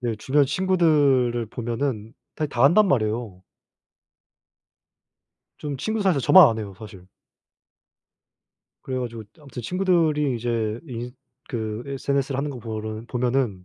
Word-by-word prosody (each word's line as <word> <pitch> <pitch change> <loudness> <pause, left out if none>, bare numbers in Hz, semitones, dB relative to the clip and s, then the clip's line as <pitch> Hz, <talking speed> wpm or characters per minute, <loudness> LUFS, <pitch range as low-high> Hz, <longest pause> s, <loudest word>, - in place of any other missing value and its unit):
네 120 -2 -2
주변 140 +5 +2
친구들을 145 -9 +2
보면은 115 -2 -3 0.2
타 155 - -1
다 120 -3 -2
한단 185 +9 +6
말이에요. 110 - -1 2.2
좀 145 -2 -5
친구들 220 +8 -2
사이에서 170 -8 +2
저만 185 +2 +8
안 110 -1 -2
해요, 100 -3 -6
사실. 95 -4 -12 1.8
그래 130 -1 -4
가지고 115 -3 -5 0.2
아무튼 135 -5 -9
친구들이 160 -5 +1
이제 115 -1 -2
인 120 0 -6 0.4
그 110 -1 -4
SNS를 140 0 -2
하는 145 +2 -1
거 130 -4 -7
보른 110 0 -6
보면은 125 -6 -1
125 Hz, 270 characters per minute, -24 LUFS, 115-145 Hz, 2.2 s, 저만